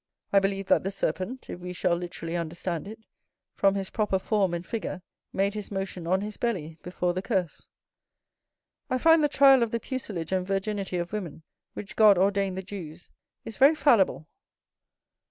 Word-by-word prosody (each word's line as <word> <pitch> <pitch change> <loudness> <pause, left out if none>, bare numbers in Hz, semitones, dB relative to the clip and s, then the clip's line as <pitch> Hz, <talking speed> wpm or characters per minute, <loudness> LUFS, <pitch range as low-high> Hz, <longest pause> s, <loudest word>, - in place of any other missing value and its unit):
I 200 - +7
believe 195 0 -1
that - - +3
the 195 - -1
serpent 200 +4 -3
(if - - -7
we 180 0 -6
shall 180 -1 +1
literally 170 -1 -5
understand 170 +1 -3
it), 220 +2 -8 0.6
from 195 0 +2
his 195 -1 -3
proper 210 -3 +1
form 195 -1 +1
and 175 0 -4
figure, 190 -3 -5 0.3
made 195 +1 0
his 210 -1 -6
motion 195 -3 -4
on 185 +2 +2
his 210 0 -6
belly, 165 -9 -3
before 180 0 -2
the 185 - -2
curse. 190 -6 -2 1.2
I 255 - +1
find 325 +3 +5
the 295 - +3
trial 275 -2 +6
of 235 - +1
the 230 - -2
pucelage 205 - -5
and 185 -1 +1
virginity 195 -1 -2
of 175 +3 -4
women, 175 -7 -5 0.3
which 205 - -7
God 210 -3 +7
ordained 195 0 +1
the 190 - -4
Jews, 175 -4 -9 0.3
is 225 - -7
very 280 +3 +6
fallible. 215 - +3
195 Hz, 175 wpm, -27 LUFS, 180-215 Hz, 1.2 s, I